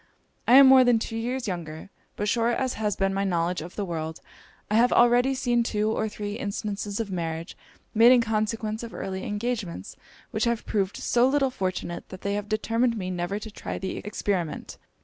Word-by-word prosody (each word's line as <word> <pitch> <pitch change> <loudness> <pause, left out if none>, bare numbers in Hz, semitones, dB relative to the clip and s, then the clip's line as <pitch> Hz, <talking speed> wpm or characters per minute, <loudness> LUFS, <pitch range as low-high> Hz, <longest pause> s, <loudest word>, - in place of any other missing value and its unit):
I 245 - +7
am 275 +1 +10
more 265 -1 +8
than 245 -2 +4
two 225 0 -4
years 245 +2 -2
younger: 170 -1 -6 0.2
but 205 - -2
short 230 +2 +1
as 260 -1 -1
has 210 -3 -1
been 195 0 0
my 195 +1 0
knowledge 175 -2 0
of 175 +3 -9
the 205 - -2
world, 160 -2 -4 0.5
I - - +1
have 235 +3 +4
already 245 +2 +4
seen 240 -2 +1
two 215 -2 0
or 220 0 -1
three 210 +1 -5
instances 205 0 -3
of 215 -3 -3
marriages 165 -2 -4 0.4
made 230 +3 +7
in 255 - +7
consequence 220 -1 -1
of 230 -1 -8
early 190 0 -4
engagements, 205 - -4 0.4
which 215 +2 0
have 235 -1 -1
proved 195 -2 -1
so 245 +1 +3
little 270 -1 +2
fortunate 185 -5 -4
that 185 - -9
they 200 - -1
have 205 0 -3
determined 230 +2 +1
me 185 -2 -3
never 180 +2 -2
to 215 +1 -8
try - - -5
the 190 - -4
experiment. 190 -6 -3
210 Hz, 195 wpm, -26 LUFS, 190-235 Hz, 0.5 s, am